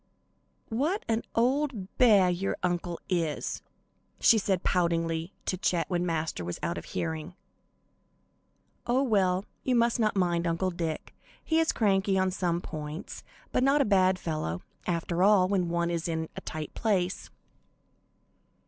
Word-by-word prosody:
"What 300 - -1
an 225 0 +1
old 250 -4 0
beah 205 -7 +6
your 190 +2 -2
uncle 175 -1 -1
is," 165 -5 -1 0.6
she 225 - +6
said, 190 -3 0
poutingly, 165 -1 0
to 185 - -1
Chet 175 -3 0
when 175 0 0
Master 160 - -2
was 85 0 -4
out 170 - -1
of - - -12
hearing. 160 +1 -4 1.5
"Oh 250 +3 +3
well, 195 -5 +2 0.2
you 255 - +1
must 235 0 +2
not 215 -2 +2
mind 175 -2 +1
Uncle 170 +3 0
Dick; 165 -3 -4 0.3
he 320 0 +2
is 325 - +3
cranky 195 -2 +2
on 190 0 +2
some 175 -2 -1
points, 155 +2 -7 0.3
but - - +1
not 275 +3 +4
a 280 - +4
bad 190 -2 +3
fellow, 155 - -3 0.2
after 170 0 -1
all, 195 -1 +5
when 185 -3 0
one 170 0 0
is 170 -1 -2
in 160 -1 -2
a - - -6
tight 155 -1 -6
place." 190 -4 -1
180 Hz, 150 wpm, -28 LUFS, 170-210 Hz, 1.5 s, beah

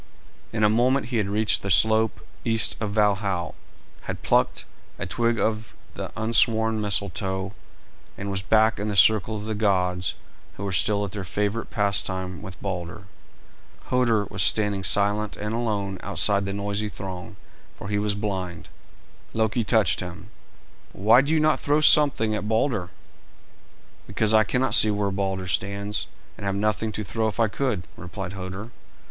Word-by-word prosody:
In 110 -1 -1
a - - +6
moment 120 +3 +2
he 125 - -1
had 105 -3 0
reached 105 +1 +1
the 100 - -4
slope 110 +4 +3 0.2
east 115 -2 +2
of 105 - -2
Valhal, 100 -4 0 0.5
had - - -6
plucked - - +1 0.3
a - - -4
twig 115 -1 0
of 110 0 -2 0.2
the - - -6
unsworn 110 0 +2
Mistletoe, 95 -1 -1 0.6
and 100 0 -4
was 95 -1 -2
back 110 +3 +2
in 105 - -3
the 105 - -2
circle 110 +2 +4
of 105 - -7
the 110 - -3
gods, 90 -4 0 0.4
who 100 - -6
were 100 - -2
still 100 +3 +1
at 100 - -7
their 100 -1 -5
favourite 105 +4 -2
pastime 95 -3 -1
with 95 -3 -10
Balder. 95 +1 -5 0.9
Hoder 120 -5 +2
was 100 -1 -3
standing 100 0 +3
silent 100 +2 +3
and 105 +1 -4
alone 105 -5 -2
outside 100 +2 0
the 100 - -3
noisy 100 +1 -2
throng, 95 +1 -8 0.4
for - - -9
he 105 0 -1
was 105 -1 0
blind. 95 -5 -4 0.7
Loki 110 +1 +1
touched 110 -5 +2
him. 90 -1 -8 0.6
"Why 110 +6 +5
do 140 +3 -2
you 160 - +3
not 155 0 +2
throw 145 +1 +1
something 145 -8 +4
at 105 0 -3
Balder?" 110 -4 0 1.2
"Because 105 +2 +1
I 110 0 +5
cannot 130 +6 0
see 110 - +8
where 105 -1 0
Balder 95 -1 -2
stands, 100 +2 -2 0.3
and - - -6
have 100 - -1
nothing 105 +2 -1
to 105 - -4
throw 110 +3 -1
if 110 - -5
I 115 - +4
could," 110 -4 -2
replied 90 +1 -7
Hoder. 95 +4 -7
105 Hz, 165 wpm, -24 LUFS, 95-110 Hz, 1.2 s, see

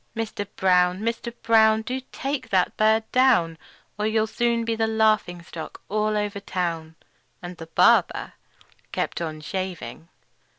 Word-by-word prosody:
Mister 220 -2 -3
Brown! 185 -1 +2
Mister 230 +1 -2
Brown! 220 -2 +3
Do 255 +4 -3
take 275 0 -4
that 185 -2 +1
bird 220 +1 +3
down, 210 -11 +3 0.4
Or 210 - +1
you'll 220 0 +2
soon 235 +1 0
be 230 0 0
the 225 0 0
laughing 215 -6 +1
stock 165 -1 -9
all 215 0 0
over 205 -1 -2
town!" 170 -5 -3 0.5
And 175 0 -7
the 165 - -9
barber 165 - +3 0.6
kept - - -2
on 155 -2 -4
shaving. 185 -1 -5
210 Hz, 140 wpm, -24 LUFS, 180-225 Hz, 0.6 s, Brown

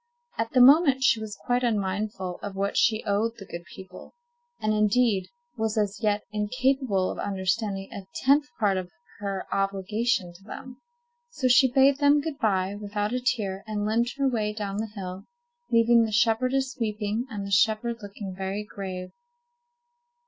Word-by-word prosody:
At 225 0 0
the 255 - +5
moment 275 0 +6
she 230 -4 +4
was 215 -2 -6
quite 245 0 +1
unmindful 200 -4 -2
of 200 -1 -6
what 200 +1 -1
she 220 -1 +3
owed 220 +2 0
the 195 - -10
good 170 -1 -8
people, 185 - -12 0.4
and, 215 0 0
indeed, 210 -2 +2 0.3
was 220 -1 -1
as 205 0 -1
yet 210 -1 +1
incapable 220 -1 0
of - - -7
understanding 195 0 -1
a 195 -1 -8
tenth 285 +2 +3
part 200 -3 +2
of 185 -1 -4 0.3
her 195 -2 -3
obligation 195 0 0
to 180 +3 -18
them. 255 +4 -9 0.5
So 295 - -1
she 255 +1 +5
bade 270 +1 +4
them 290 0 +5
good 295 -1 -5
by 195 -5 +1
without 205 +1 -3
a 250 - -1
tear, 200 -6 -1
and 210 -1 -2
limped 235 +4 0
her 275 -1 +2
way 215 -4 0
down 205 -2 -4
the 220 +1 -2
hill, 190 -3 -7 0.5
leaving 230 0 +5
the 220 - -2
shepherdess 255 +5 +1
weeping, 215 +1 -2
and 205 -4 -5
the 200 - -6
shepherd 220 +4 +2
looking 200 -1 -7
very 195 +2 -3
grave. 190 -3 -7
215 Hz, 165 wpm, -26 LUFS, 195-240 Hz, 0.5 s, moment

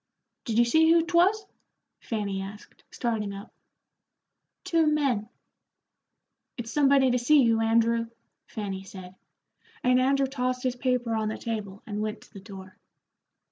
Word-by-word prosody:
"Did 225 -3 -2
you 240 - +5
see 320 +7 +4
who 335 0 +4
'twas?" 365 +5 +2 0.5
Fanny 200 -4 -3
asked, 200 +2 -11
starting 215 -4 -3
up. 200 +3 -11 1.1
"Two 330 -4 +2
men." 270 -8 0 1.3
"It's 235 -1 -6
somebody 275 -3 +4
to 250 - +1
see 280 +3 +4
you, 225 -1 +2
Andrew," 230 +1 +2 0.4
Fanny 200 -3 -5
said, 185 -1 -11 0.7
and 250 0 +4
Andrew 275 +1 +2
tossed 255 -1 -2
his 255 -1 -1
paper 250 -2 -1
on 220 -1 -1
the 215 - -3
table 210 -4 -5
and 210 -1 -4
went 215 0 -4
to - - -20
the 195 - -9
door. 190 -1 -12
235 Hz, 140 wpm, -27 LUFS, 210-270 Hz, 1.3 s, you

